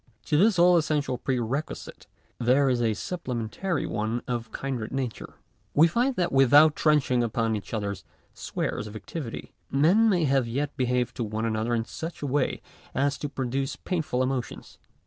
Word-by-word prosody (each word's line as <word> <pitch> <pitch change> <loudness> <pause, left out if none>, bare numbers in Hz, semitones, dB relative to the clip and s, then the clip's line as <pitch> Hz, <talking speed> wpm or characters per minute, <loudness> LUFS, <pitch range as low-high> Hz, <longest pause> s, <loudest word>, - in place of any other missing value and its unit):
To 150 - 0
this 200 +3 +4
all 175 0 +6
essential 150 -5 0
pre 130 -2 -1
requisite 130 +6 -4 0.3
there 130 +3 +3
is 125 -2 +1
a 110 -2 +1
supplementary 165 - -3
one 110 +3 -2
of 120 -2 -3
kindred 130 -5 -4
nature. 130 -4 -4 0.4
We 155 +3 +7
find 245 +9 +1
that 175 -4 0
without 145 +3 +6
trenching 145 -5 +2
upon 115 -1 0
each 105 - -7
other's 100 -3 -3 0.3
spheres 105 - -3
of 105 - -10
activity, 115 - -7 0.2
men 180 +11 +4
may 180 -5 +2
yet 135 0 0
behave 125 -2 0
to 120 - -3
one 110 +1 -3
another 110 +1 0
in 115 -1 -1
such 165 +5 -7
a - - 0
way 140 0 0 0.3
as 140 +1 +1
to 145 - -3
produce 135 0 -2
painful 155 -8 -1
emotions. 130 -2 -4
135 Hz, 165 wpm, -26 LUFS, 115-155 Hz, 0.4 s, We